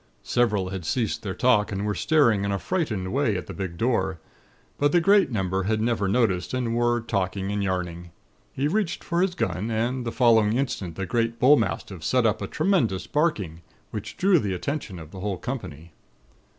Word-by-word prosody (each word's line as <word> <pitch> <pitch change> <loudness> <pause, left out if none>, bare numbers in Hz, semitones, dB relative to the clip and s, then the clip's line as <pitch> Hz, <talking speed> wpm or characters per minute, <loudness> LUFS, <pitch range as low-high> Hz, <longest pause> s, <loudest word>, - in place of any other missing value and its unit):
Several 105 -6 +1
had 95 -2 -5
ceased 110 +6 -1
their 95 -3 -4
talk, 115 -4 +3
and 100 +1 -2
were 105 - 0
staring 115 -8 +3
in 100 - -1
a 100 - 0
frightened 110 - -2
way 130 -7 +1
at 90 - -5
the - - -8
big 95 -4 -5
door; 95 -6 0 0.6
but 145 0 +3
the 175 - +6
great 195 +1 +4
number 95 -5 -1
had 110 +1 +1
never 110 -3 0
noticed, 100 -2 +1
and 120 -2 -1
were 120 0 +2
talking 100 -3 -2
and 105 -1 -1
yarning. 90 -2 -3 0.4
He 140 +2 -1
reached 190 +1 -1
for 170 +1 0
his 185 -1 +1
gun, 110 - -2
and 120 +3 -1
the 115 - -3
following 115 -4 +4
instant 115 - -2
the 95 - -3
great 115 +4 0
bullmastiff 105 - +2
set 125 +5 +2
up 110 - +1
a 100 - -3
tremendous 120 - +1
barking, 105 - -1 0.3
which 105 0 -6
drew 190 -2 +4
the 100 -7 -2
attention 120 - -4
of 80 -1 -10
the 95 - -9
whole 100 0 -2
company. 85 - -6
110 Hz, 190 wpm, -25 LUFS, 95-130 Hz, 0.6 s, the